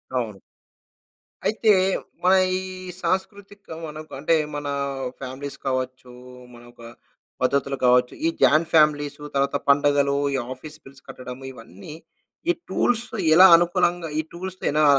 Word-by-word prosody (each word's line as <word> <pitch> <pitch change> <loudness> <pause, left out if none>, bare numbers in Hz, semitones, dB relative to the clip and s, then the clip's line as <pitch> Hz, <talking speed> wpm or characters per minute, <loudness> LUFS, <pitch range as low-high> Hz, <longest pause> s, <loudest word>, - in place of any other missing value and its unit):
అవును. 110 -6 -3 1.1
అయితే, 220 0 +3 0.5
మన 185 +1 +5 0.2
ఈ - - -5 0.4
సాంస్కృతిక 200 +1 -3 0.2
మనకు 155 +1 -10
అంటే, 160 +3 +2 0.2
మన 145 -1 -4 0.5
ఫ్యామిలీస్ 135 +2 -7
కావచ్చు, 130 -1 -3 0.4
మన 120 - -14
ఒక - - -18 0.6
పద్ధతులు 135 +1 0
కావచ్చు. 125 0 +3
ఈ - - +3
జాయింట్ 155 +1 +4
ఫ్యామిలీస్సు 150 -2 +2
తర్వాత 140 +1 +1
పండగలు. 140 0 +3 0.2
ఈ - - +1 0.2
ఆఫీస్ 150 +4 -11
బిల్స్ 135 -1 -16
కట్టడం. 125 0 -8
ఇవన్నీ, 115 - -12 0.6
ఈ - - +5 0.2
టూల్స్ 240 0 +1 0.3
ఎలా 185 +2 +9
అనుకూలంగా, 175 -1 0
ఈ 155 - 0
టూల్స్ 185 +1 -7
ఎలా 150 0 +3
145 Hz, 125 wpm, -23 LUFS, 130-175 Hz, 1.1 s, ఎలా